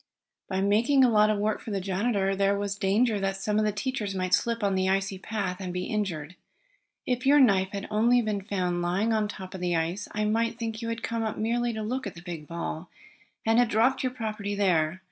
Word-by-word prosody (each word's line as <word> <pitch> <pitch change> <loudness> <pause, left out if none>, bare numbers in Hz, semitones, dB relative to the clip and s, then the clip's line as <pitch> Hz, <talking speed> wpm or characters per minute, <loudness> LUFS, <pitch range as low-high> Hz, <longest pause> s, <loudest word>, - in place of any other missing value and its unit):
"Besides 190 +1 0
making 235 +7 +4
a 250 - +5
lot 210 -1 +5
of 215 - +1
work 210 +1 -1
for - - -8
the 200 -2 -1
janitor, 195 +1 0
there 200 +1 +2
was 200 0 -2
danger 205 +3 +2
that 195 0 -1
some 210 +2 0
of 215 - +2
the 210 - +2
teachers 210 -1 -3
might 185 -1 -1
slip 230 -2 +1
on 200 -1 +2
the 190 0 +1
icy 195 0 0
path 195 -4 -3
and 185 -2 -4
be 180 0 -3
injured. 180 -6 -3 0.7
If 250 +1 -1
your 290 +1 +7
knife 195 -7 +4
had 200 0 -5
only 235 +3 +4
been 210 -2 -1
found 180 -3 -1
lying 190 +6 +1
on 215 -1 +1
top 190 -2 -8
of 190 - -7
the 175 -1 0
ice 170 +5 -2
I 215 0 -1
might 230 +2 0
think 225 -1 -4
you 230 - -3
had 230 0 -4
come 230 0 -2
up 220 -1 -2
merely 235 +2 0
to 220 -1 -4
look 250 +2 -3
at 195 - -8
the 170 - -11
big 165 -4 -7
ball, 170 0 -5 0.6
and 225 +1 +4
had 245 -2 +3
dropped 235 +5 +2
your 255 - -1
property 215 -4 -4
there. 180 -4 +1
205 Hz, 235 wpm, -27 LUFS, 190-225 Hz, 0.7 s, your